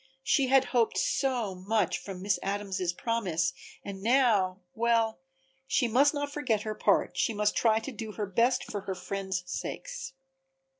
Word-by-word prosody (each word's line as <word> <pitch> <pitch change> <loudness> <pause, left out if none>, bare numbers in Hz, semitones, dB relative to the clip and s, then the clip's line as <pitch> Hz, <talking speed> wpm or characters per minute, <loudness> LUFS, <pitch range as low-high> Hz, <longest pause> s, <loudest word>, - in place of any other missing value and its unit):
She 270 -1 +3
had 270 0 +5
hoped 235 -3 +2
so 245 -7 0
much 195 +1 0
from 190 -2 -8
Miss 200 0 +1
Adams' 195 -2 -2
promise 180 -4 -1 0.3
and 195 -1 -6
now 210 -6 +3
well, 230 0 +1 0.5
she 255 -2 +2
must 270 +6 +4
not 285 -1 -3
forget 235 -8 0
her 215 - -3
part, - - +2
she 225 - 0
must 210 0 +1
try 220 -2 +3
to 225 +5 -4
do 220 -2 -6
her 210 - -2
best 235 +6 +2
for 205 - -5
her 190 -1 -4
friends' 190 -1 -3
sakes. - - -5
220 Hz, 160 wpm, -29 LUFS, 195-245 Hz, 0.5 s, had